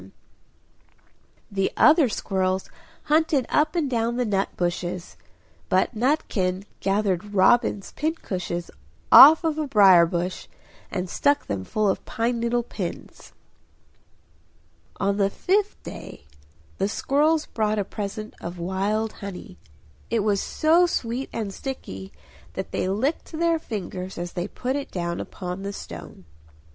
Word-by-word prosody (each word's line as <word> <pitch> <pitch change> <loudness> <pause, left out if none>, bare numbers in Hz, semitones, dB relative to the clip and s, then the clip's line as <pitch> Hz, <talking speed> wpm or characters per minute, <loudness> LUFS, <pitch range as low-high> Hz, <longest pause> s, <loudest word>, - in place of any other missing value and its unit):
The 195 -1 0
other 310 -4 +6
squirrels 190 -2 -1 0.3
hunted 305 -4 +2
up 305 +3 +2
and 325 -4 +1
down 235 -2 0
the 250 - +1
nut 195 -2 0
bushes; 175 0 -3 0.5
but 185 +6 +2
Nutkin 210 - 0 0.2
gathered 200 0 -1
robin's 205 +1 +3
pincushions 185 - -3 0.4
off 315 +5 +10
a 325 -1 +1
briar 190 -8 +7
bush, 175 +1 -3 0.4
and 185 -2 -3
stuck 285 +10 +1
them 100 -2 -3
full 215 - 0
of 190 - 0
pine 235 +1 -1
needle 235 +1 0
pins. 190 -6 -7 1.7
On 200 0 +1
the 200 -1 +2
fifth 400 - 0
day - - -9 0.5
the 195 +1 +1
squirrels 300 +7 +1
brought 215 -1 -1
a 205 - +1
present 215 +1 -5
of 175 +1 -6
wild 200 +5 -1
honey; 185 - -9 0.5
it 230 - +1
was 205 -2 +1
so 335 +3 +3
sweet 245 -3 -2
and 210 -4 -4
sticky 95 - -7 0.4
that - - -5
they - - -1
licked 260 +15 -1
their 335 0 +1
fingers 190 - -6
as 175 0 -5
they 175 +1 -3
put 255 +5 -3
it 285 -1 -4
down 170 -1 -3
upon 180 0 -6
the 200 0 -4
stone. 85 - -9
205 Hz, 130 wpm, -24 LUFS, 185-260 Hz, 1.7 s, off